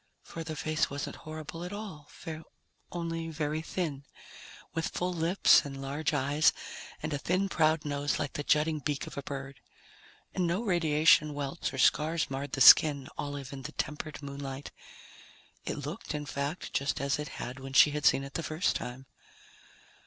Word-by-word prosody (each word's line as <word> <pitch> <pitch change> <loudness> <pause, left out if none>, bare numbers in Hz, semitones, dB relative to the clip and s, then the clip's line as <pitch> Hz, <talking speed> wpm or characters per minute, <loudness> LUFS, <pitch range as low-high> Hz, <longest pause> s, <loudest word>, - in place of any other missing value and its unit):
For 165 - -7
the 160 -1 -5
face 155 +1 0
wasn't 140 0 -5
horrible 155 +1 -7
at 180 - -5
all, 195 -9 -7 0.8
only 165 -1 -3
very 155 0 -2
thin, 160 -4 -3 0.7
with 165 0 -1
full 180 0 -2
lips 170 +3 +5
and 135 -1 -7
large 140 +3 -2
eyes 145 +1 +3 0.5
and - - -2
a 145 - -1
thin 185 +6 +1
proud 155 -2 +2
nose 145 0 0
like 145 -3 -3
the - - -3
jutting 155 +1 +2
beak 145 -1 -2
of - - -9
a 140 - -3
bird. 135 0 -7 0.7
And 180 -2 +1
no 180 +7 0
radiation 155 -5 +4
welts 145 +3 -3
or - - -7
scars 155 +3 +2
marred 135 +1 -4
the 135 - -1
skin, 140 -1 +8
olive 145 -2 -5
in 135 - -7
the 130 - -7
tempered 150 0 -4
moonlight. 140 -1 -6 0.9
It - - -2
looked, 150 - -5
in 150 0 -3
fact, 145 +4 -4
just 140 +1 0
as 140 +1 0
it 150 - -3
had 125 +2 -5
when 135 0 -8
she 150 - +7
had 150 -1 +2
seen 135 - +4
it 135 0 -8
the - - -2
first 155 +3 0
time. 125 +2 -5
150 Hz, 175 wpm, -30 LUFS, 140-160 Hz, 0.9 s, skin